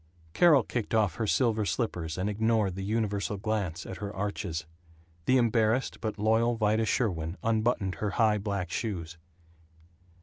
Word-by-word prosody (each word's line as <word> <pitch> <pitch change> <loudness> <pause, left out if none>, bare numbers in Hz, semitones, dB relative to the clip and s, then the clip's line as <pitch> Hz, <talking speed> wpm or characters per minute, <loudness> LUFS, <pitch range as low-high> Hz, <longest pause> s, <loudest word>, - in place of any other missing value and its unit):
Carol 150 - +6
kicked 115 -1 -3
off 105 -7 +2
her 110 - -1
silver 110 -2 +2
slippers, 80 -2 -2
and 95 +2 -1
ignored 110 -1 +1
the 95 +1 -5
universal 105 -1 -1
glance 100 -5 -2
at 95 - -7
her 100 +1 -5
arches. 95 -5 -3 0.6
The 130 - +4
embarrassed 115 +1 +1
but 110 -2 -3
loyal 110 +3 +2
Vida 110 0 +2
Sherwin 90 -7 -1
unbuttoned 110 -4 +1
her 105 - 0
high 110 -2 +3
black 100 -3 -3
shoes. 85 -6 -4
105 Hz, 145 wpm, -29 LUFS, 95-115 Hz, 0.6 s, Carol